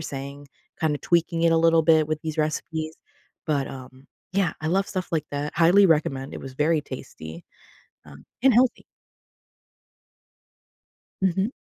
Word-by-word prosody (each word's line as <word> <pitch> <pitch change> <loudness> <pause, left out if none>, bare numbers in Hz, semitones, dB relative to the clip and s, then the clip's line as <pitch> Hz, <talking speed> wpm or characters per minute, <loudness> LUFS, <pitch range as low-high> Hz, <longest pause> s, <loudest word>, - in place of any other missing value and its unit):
saying, 140 -1 -7 0.3
kinda 155 -2 +1
tweaking 170 -1 +1
it 165 - +4
a 165 - +4
little 165 0 +4
bit 155 -1 +4
with 155 -1 -1
these 160 0 -5
recipes, 155 +1 -2 0.5
but, 140 -3 0
um, 130 +1 -11 0.3
yeah, 190 -3 +1
I 155 - -1
love 195 +3 +1
stuff 185 -2 -4
like 155 -2 -1
that, 145 +1 -3
highly 175 +5 +5
recommend, 140 -4 0
it - - -7
was 135 -1 -9
very 155 +2 +2
tasty, 85 - -9 0.6
uh, 70 -1 -12 0.3
and 265 - +6
healthy. 250 +1 +3 2.4
Mhm. 190 +3 +1
155 Hz, 145 wpm, -24 LUFS, 140-170 Hz, 2.4 s, and